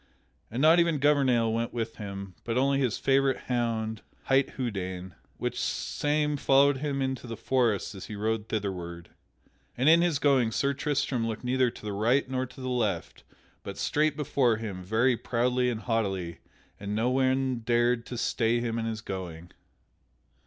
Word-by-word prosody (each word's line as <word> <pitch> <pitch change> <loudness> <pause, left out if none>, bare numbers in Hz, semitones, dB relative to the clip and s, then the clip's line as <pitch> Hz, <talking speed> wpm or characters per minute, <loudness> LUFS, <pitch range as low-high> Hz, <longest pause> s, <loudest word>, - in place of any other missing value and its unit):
And 125 +5 -2
not 160 +3 +7
even 170 -2 +3
Gouvernail 130 -6 +3
went 115 +1 -2
with 115 -1 -3
him, 100 -2 -7
but 115 0 -2
only 135 +1 +2
his 125 -5 0
favorite 135 -1 +2
hound, 115 -3 -1 0.2
hight 135 0 +2
Houdaine, 95 -7 -4 0.2
which - - -3
same 150 0 0
followed 140 0 +4
him 140 -1 -2
into 130 -1 -3
the 115 -1 -6
forest 120 -7 0
as 95 - -9
he 105 - -6
rode 110 +1 -2
thitherward. 90 -5 -4 0.7
And 130 +4 +1
in 165 +2 +7
his 170 -4 +2
going 135 -5 +3
Sir 140 +4 +1
Tristram 140 -4 -1
looked 110 +1 -4
neither 125 0 +2
to 110 - -12
the 105 - -3
right 120 +8 +2
nor 130 0 -2
to 130 - -13
the 130 - -4
left 110 -9 -2 0.4
but - - -7
straight 150 0 +1
before 135 -6 +2
him 100 -5 -6
very 115 +6 +2
proudly 125 +2 0
and 115 -2 -3
haughtily, 95 -8 -2 0.4
and 100 +1 -4
no 115 +3 +1
one 130 -1 +1
dared 120 +1 +1
to 125 - -6
stay 115 0 +1
him 115 -1 -2
in 115 - -2
his 110 -1 -3
going. 90 -4 -7
120 Hz, 170 wpm, -28 LUFS, 110-135 Hz, 0.7 s, not